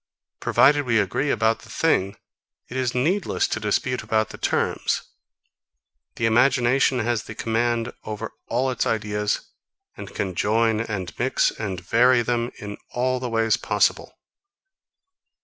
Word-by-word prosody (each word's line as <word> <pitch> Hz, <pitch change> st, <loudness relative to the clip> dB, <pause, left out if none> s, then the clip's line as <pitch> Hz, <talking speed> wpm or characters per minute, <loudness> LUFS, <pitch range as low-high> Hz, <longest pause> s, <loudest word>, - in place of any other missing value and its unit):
Provided 145 Hz, +1 st, +4 dB
we 115 Hz, -2 st, +3 dB
agree 110 Hz, +8 st, 0 dB
about 110 Hz, -2 st, +2 dB
the -, -, -16 dB
thing, 100 Hz, -12 st, +1 dB, 0.5 s
it 120 Hz, -, -8 dB
is 130 Hz, -2 st, -1 dB
needless 175 Hz, +11 st, +1 dB
to -, -, -2 dB
dispute 125 Hz, +5 st, -1 dB
about 110 Hz, 0 st, 0 dB
the -, -, -9 dB
terms. -, -, 0 dB, 1.1 s
The 115 Hz, -, -1 dB
imagination 125 Hz, +3 st, +3 dB
has 120 Hz, -2 st, -1 dB
the 105 Hz, -, -8 dB
command 115 Hz, +1 st, -1 dB
over 110 Hz, +1 st, -5 dB, 0.2 s
all 130 Hz, +3 st, 0 dB
its 125 Hz, -, -1 dB
ideas, 105 Hz, -1 st, -1 dB, 0.5 s
and -, -, -9 dB
can 95 Hz, -2 st, -3 dB
join 110 Hz, +4 st, +2 dB
and 100 Hz, -7 st, -4 dB
mix 130 Hz, +2 st, +2 dB
and 95 Hz, -5 st, -5 dB
vary 120 Hz, +7 st, +3 dB
them, 120 Hz, 0 st, -1 dB
in 105 Hz, 0 st, -7 dB
all 130 Hz, +1 st, 0 dB
the 125 Hz, -1 st, -4 dB
ways 115 Hz, -1 st, +2 dB
possible. -, -, 0 dB
115 Hz, 140 wpm, -23 LUFS, 105-125 Hz, 1.1 s, Provided